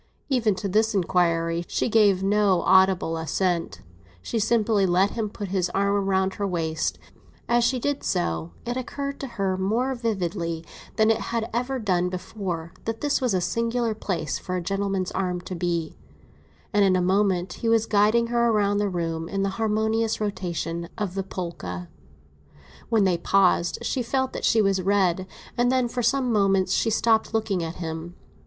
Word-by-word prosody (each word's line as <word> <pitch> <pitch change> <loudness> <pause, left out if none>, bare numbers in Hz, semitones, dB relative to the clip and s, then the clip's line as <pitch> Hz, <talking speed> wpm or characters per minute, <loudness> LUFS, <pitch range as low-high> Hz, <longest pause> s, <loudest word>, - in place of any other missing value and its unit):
Even 230 -7 +2
to 200 - -3
this 215 +3 +2
inquiry 170 -2 +1
she - - -1
gave 205 -4 +4
no 195 -3 +3
audible 190 -3 +4
assent; 165 - -1 0.4
she 230 - -2
simply 215 -2 +2
let 185 +3 +3
him 220 -3 -2
put 205 -1 -6
his 185 -2 0
arm 200 0 +1
round 190 0 +1
her 200 - -2
waist—as 175 +7 -2
she 245 +2 +2
did 285 +3 -2
so 85 - -1 0.2
it 240 +1 -2
occurred 280 +2 -4
to 275 - -4
her 195 -2 0
more 230 +8 0
vividly 175 -8 -2 0.3
than 220 0 +4
it 225 - +1
had 230 -1 -1
ever 250 +3 -1
done 180 -6 0
before, 180 -3 -5
that 225 0 -3
this 290 -1 +1
was 245 -6 +1
a - - +2
singular 230 +3 0
place 185 -7 -3
for 185 - -4
a - - 0
gentleman's 195 0 -1
arm 180 -2 -1
to 180 - -7
be—and 175 +4 -4
in 190 -1 +4
a - - +2
moment 185 0 +1
he 230 - +1
was 225 -1 +3
guiding 215 +2 +3
her 235 0 +2
round 205 -1 +2
the 205 -1 +1
room 165 -2 -3
in 195 0 -1
the 195 - +1
harmonious 220 +1 +1
rotation 170 -4 -3
of 205 -5 -2
the 195 - -1
polka. 170 - -6 1.0
When 225 -3 +3
they 180 -3 +2
paused 180 -3 +2
she 260 - -1
felt 260 +2 -1
that - - -3
she 225 -2 +4
was 195 -1 +2
red; 185 -1 +1 0.3
and 245 +1 +2
then, 255 -1 +2
for 245 +1 -3
some 245 +1 +1
moments, 195 -2 +2
she 225 - +2
stopped 225 0 +2
looking 210 -5 0
at 165 +1 -5
him. 165 0 -6
195 Hz, 175 wpm, -25 LUFS, 180-225 Hz, 1.0 s, gave